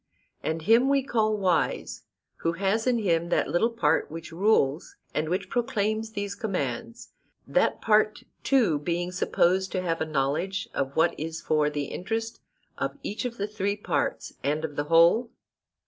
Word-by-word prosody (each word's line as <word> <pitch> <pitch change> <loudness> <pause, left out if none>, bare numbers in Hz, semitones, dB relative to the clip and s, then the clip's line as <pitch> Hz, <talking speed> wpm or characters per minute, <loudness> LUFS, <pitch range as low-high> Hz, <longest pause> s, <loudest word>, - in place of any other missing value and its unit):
And 160 0 -2
him 230 +8 +5
we 275 -1 +3
call 215 -4 +1
wise 185 -4 0 0.3
who 165 - -1
has 200 +6 0
in 250 -1 +3
him 170 -6 +1
that - - +2
little 200 +7 +2
part 160 -10 +1
which 165 +1 -8
rules, 170 -5 +1 0.2
and 155 +1 -1
which 185 +2 -1
proclaims 220 -1 -1
these 205 -1 -3
commands; 230 +2 -4 0.4
that - - +1
part 215 -1 +2 0.2
too 225 - +3
being 175 +4 -2
supposed 185 +1 +1
to 185 - 0
have 165 -2 -1
a - - +1
knowledge 155 +7 -1
of 135 0 -2
what 165 +1 +3
is 160 +1 -4
for 155 -2 +1
the 145 -1 -2
interest 225 +8 -4 0.4
of - - -2
each 210 +5 -4
of 235 -1 -4
the 200 - -1
three 205 -1 -2
parts 205 - -2
and 150 +3 0
of 150 -2 -7
the 145 - -1
whole? 170 +9 +5
190 Hz, 165 wpm, -27 LUFS, 165-220 Hz, 0.4 s, him